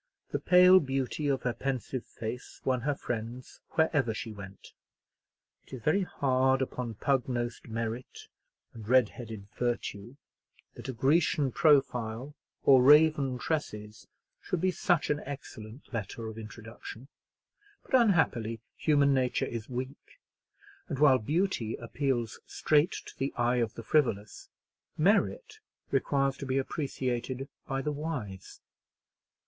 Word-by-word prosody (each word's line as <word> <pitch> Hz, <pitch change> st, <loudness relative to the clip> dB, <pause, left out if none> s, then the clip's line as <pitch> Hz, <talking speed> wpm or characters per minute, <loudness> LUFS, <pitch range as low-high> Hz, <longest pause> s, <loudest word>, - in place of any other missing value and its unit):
The -, -, -1 dB
pale 180 Hz, +1 st, +7 dB
beauty 135 Hz, 0 st, -2 dB
of 135 Hz, -2 st, 0 dB
her 125 Hz, -, 0 dB
pensive 130 Hz, -1 st, -3 dB
face 115 Hz, +3 st, -7 dB
won 130 Hz, -2 st, +1 dB
her 145 Hz, +3 st, 0 dB
friends 120 Hz, 0 st, -6 dB
wherever 145 Hz, -8 st, +2 dB
she 110 Hz, -, -5 dB
went. 100 Hz, -1 st, -11 dB, 0.9 s
It -, -, -15 dB
is 125 Hz, -4 st, -7 dB
very 155 Hz, +6 st, +3 dB
hard 130 Hz, -6 st, +2 dB
upon 125 Hz, -3 st, -3 dB
pug 135 Hz, +4 st, 0 dB
nosed 120 Hz, -1 st, -3 dB
merit 115 Hz, +2 st, -5 dB, 0.5 s
and 110 Hz, -3 st, -10 dB
red 125 Hz, -3 st, +5 dB
haired 110 Hz, -4 st, -9 dB
virtue, 120 Hz, -1 st, -3 dB, 0.6 s
that -, -, -8 dB
a -, -, 0 dB
Grecian 140 Hz, +2 st, +2 dB
profile, 135 Hz, -4 st, +2 dB, 0.3 s
or 135 Hz, -2 st, +7 dB
raven 145 Hz, -1 st, +5 dB
tresses, 105 Hz, -8 st, -4 dB, 0.3 s
should 180 Hz, -, -2 dB
be 185 Hz, +2 st, +2 dB
such 175 Hz, -3 st, +1 dB
an 150 Hz, -, 0 dB
excellent 130 Hz, -4 st, -9 dB
letter 115 Hz, +1 st, -4 dB
of 110 Hz, -, -8 dB
introduction; 115 Hz, +3 st, -10 dB, 0.8 s
but, -, -, -17 dB
unhappily, 160 Hz, -, +3 dB, 0.2 s
human 145 Hz, -2 st, +3 dB
nature 130 Hz, -2 st, +1 dB
is 115 Hz, 0 st, -6 dB
weak; 130 Hz, -, -7 dB, 0.7 s
and 140 Hz, -, -2 dB
while 135 Hz, -2 st, +6 dB
beauty 145 Hz, -, 0 dB
appeals 120 Hz, -2 st, -2 dB
straight 155 Hz, +4 st, +2 dB
to -, -, -11 dB
the 135 Hz, -, -1 dB
eye 120 Hz, +1 st, +2 dB
of 115 Hz, -2 st, -1 dB
the 115 Hz, -, -7 dB
frivolous, 110 Hz, -8 st, 0 dB, 0.5 s
merit 435 Hz, -, +1 dB, 0.3 s
requires 135 Hz, -1 st, +1 dB
to 140 Hz, -, -6 dB
be 130 Hz, +1 st, 0 dB
appreciated 130 Hz, -2 st, -2 dB, 0.2 s
by 135 Hz, 0 st, -2 dB
the 150 Hz, -, -1 dB
wise. 140 Hz, -, -6 dB
130 Hz, 130 wpm, -30 LUFS, 115-145 Hz, 0.9 s, pale